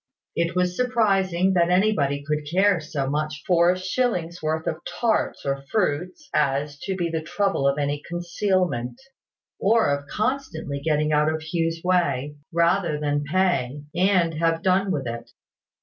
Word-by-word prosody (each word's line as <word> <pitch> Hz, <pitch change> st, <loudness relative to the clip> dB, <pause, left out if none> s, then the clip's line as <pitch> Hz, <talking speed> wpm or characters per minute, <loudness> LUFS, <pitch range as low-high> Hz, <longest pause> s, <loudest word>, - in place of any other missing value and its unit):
It 170 Hz, +1 st, 0 dB
was 180 Hz, 0 st, +1 dB
surprising 195 Hz, -7 st, +2 dB
that 175 Hz, -1 st, +3 dB
anybody 180 Hz, -8 st, +2 dB
could 150 Hz, 0 st, -2 dB
care 190 Hz, +2 st, +3 dB
so 150 Hz, -3 st, -3 dB
much 150 Hz, +1 st, -2 dB
for 175 Hz, -1 st, +4 dB
a 180 Hz, -, +2 dB
shilling's 185 Hz, -3 st, -1 dB
worth 160 Hz, +1 st, -1 dB
of 160 Hz, -, -2 dB
tarts 230 Hz, -2 st, -1 dB
or 135 Hz, 0 st, -1 dB
fruit 180 Hz, -4 st, 0 dB, 0.2 s
as 145 Hz, 0 st, 0 dB
to 190 Hz, -, -3 dB
be 175 Hz, -2 st, -1 dB
at -, -, -8 dB
the 160 Hz, -, 0 dB
trouble 180 Hz, -2 st, 0 dB
of 140 Hz, +1 st, +1 dB
any 145 Hz, 0 st, -1 dB
concealment, 175 Hz, -, -1 dB, 0.6 s
or 210 Hz, -8 st, +3 dB
of 140 Hz, 0 st, -9 dB
constantly 215 Hz, -, -2 dB
getting 150 Hz, 0 st, +1 dB
out 150 Hz, +1 st, +3 dB
of 160 Hz, 0 st, -4 dB
Hugh's 165 Hz, 0 st, -1 dB
way, 150 Hz, -6 st, +1 dB, 0.2 s
rather 170 Hz, -1 st, +2 dB
than 145 Hz, -1 st, -1 dB
pay, 150 Hz, -5 st, 0 dB
and 180 Hz, -2 st, +2 dB
have 165 Hz, +1 st, 0 dB
done 190 Hz, +1 st, +2 dB
with 140 Hz, -7 st, -2 dB
it. 115 Hz, 0 st, -6 dB
165 Hz, 160 wpm, -24 LUFS, 150-185 Hz, 0.6 s, for